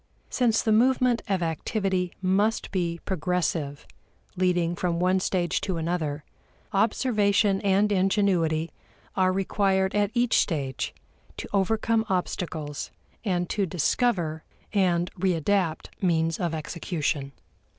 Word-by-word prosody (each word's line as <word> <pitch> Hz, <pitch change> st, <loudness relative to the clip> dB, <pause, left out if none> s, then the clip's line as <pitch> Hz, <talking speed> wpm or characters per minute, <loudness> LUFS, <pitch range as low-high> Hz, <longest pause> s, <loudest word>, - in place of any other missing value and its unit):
Since 240 Hz, -3 st, +2 dB
the 220 Hz, -, +1 dB
movement 250 Hz, +1 st, +3 dB
of 190 Hz, -3 st, +1 dB
activity 180 Hz, +2 st, -1 dB
must 200 Hz, +4 st, +1 dB
be 170 Hz, -3 st, -1 dB
progressive, 165 Hz, -5 st, -1 dB, 0.5 s
leading 175 Hz, -2 st, +1 dB
from 175 Hz, -1 st, -1 dB
one 185 Hz, +1 st, +3 dB
stage 180 Hz, -3 st, 0 dB
to 185 Hz, -3 st, -2 dB
another, 160 Hz, -3 st, -2 dB, 0.5 s
observation 205 Hz, -2 st, +2 dB
and 200 Hz, +1 st, +2 dB
ingenuity 185 Hz, -5 st, +2 dB, 0.4 s
are 185 Hz, -1 st, +3 dB
required 190 Hz, 0 st, +1 dB
at 205 Hz, -1 st, +2 dB
each 240 Hz, -1 st, +3 dB
stage 140 Hz, -7 st, -2 dB, 0.4 s
to -, -, -5 dB
overcome 220 Hz, +3 st, +2 dB
obstacles 160 Hz, -5 st, -3 dB, 0.3 s
and 180 Hz, -4 st, 0 dB
to 200 Hz, -3 st, 0 dB
discover 175 Hz, -, 0 dB, 0.3 s
and 180 Hz, -3 st, +2 dB
readapt 180 Hz, -1 st, 0 dB
means 165 Hz, -3 st, +1 dB
of 170 Hz, -3 st, -1 dB
execution. 155 Hz, -3 st, -3 dB
185 Hz, 110 wpm, -26 LUFS, 165-200 Hz, 0.5 s, movement